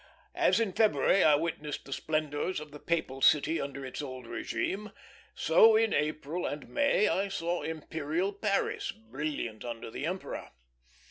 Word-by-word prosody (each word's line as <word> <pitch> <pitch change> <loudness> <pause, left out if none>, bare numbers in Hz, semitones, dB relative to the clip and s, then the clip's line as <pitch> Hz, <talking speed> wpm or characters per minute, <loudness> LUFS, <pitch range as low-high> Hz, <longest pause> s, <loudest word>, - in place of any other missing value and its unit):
As - - +3
in 220 -5 0
February 210 -2 +4
I 150 -2 +6
witnessed 150 -1 -3
the 135 - -5
splendors 155 +3 -1
of 150 -1 -10
the 150 - -10
papal 140 -6 -2
city 155 +4 +4
under 140 -1 -5
its 130 - -5
old 130 -3 -7
régime, 195 - -3 0.4
so 225 0 +6
in 225 -1 +3
April 155 +3 -1
and 145 0 -5
May 285 -7 +3
I 195 +2 +1
saw 175 -3 -2
imperial 160 +4 -2
Paris 200 0 -1
brilliant 115 -1 -5
under 115 -2 -6
the 145 - -3
emperor. 185 +2 -5
155 Hz, 150 wpm, -30 LUFS, 140-190 Hz, 0.4 s, I